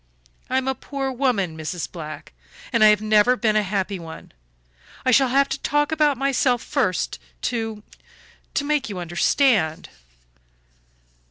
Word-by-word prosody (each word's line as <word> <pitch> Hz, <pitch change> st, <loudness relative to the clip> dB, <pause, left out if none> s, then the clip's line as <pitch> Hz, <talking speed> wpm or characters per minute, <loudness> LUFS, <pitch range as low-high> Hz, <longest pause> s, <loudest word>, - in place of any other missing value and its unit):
"I 260 Hz, -, +1 dB
am 265 Hz, 0 st, -1 dB
a 265 Hz, -, +1 dB
poor 270 Hz, 0 st, -4 dB
woman, 240 Hz, -, 0 dB
Mrs. 160 Hz, +2 st, -5 dB
Black, 155 Hz, -, -8 dB, 0.4 s
and 230 Hz, -, +4 dB
I -, -, +9 dB
have 210 Hz, 0 st, +4 dB
never 215 Hz, +3 st, +4 dB
been 220 Hz, -3 st, +1 dB
a 215 Hz, -, +4 dB
happy 195 Hz, -1 st, -2 dB
one. 160 Hz, -1 st, -10 dB, 0.7 s
I 255 Hz, -, +4 dB
shall 265 Hz, +2 st, +5 dB
have 275 Hz, +2 st, +3 dB
to -, -, -3 dB
talk 295 Hz, +1 st, 0 dB
about 300 Hz, -3 st, +2 dB
myself 260 Hz, -2 st, +1 dB
first 215 Hz, -, -1 dB, 0.2 s
to 225 Hz, -3 st, -3 dB, 0.7 s
to 285 Hz, -, +1 dB
make 295 Hz, -4 st, 0 dB
you 200 Hz, -, -5 dB
understand." 175 Hz, -, +1 dB
230 Hz, 150 wpm, -22 LUFS, 190-270 Hz, 0.7 s, I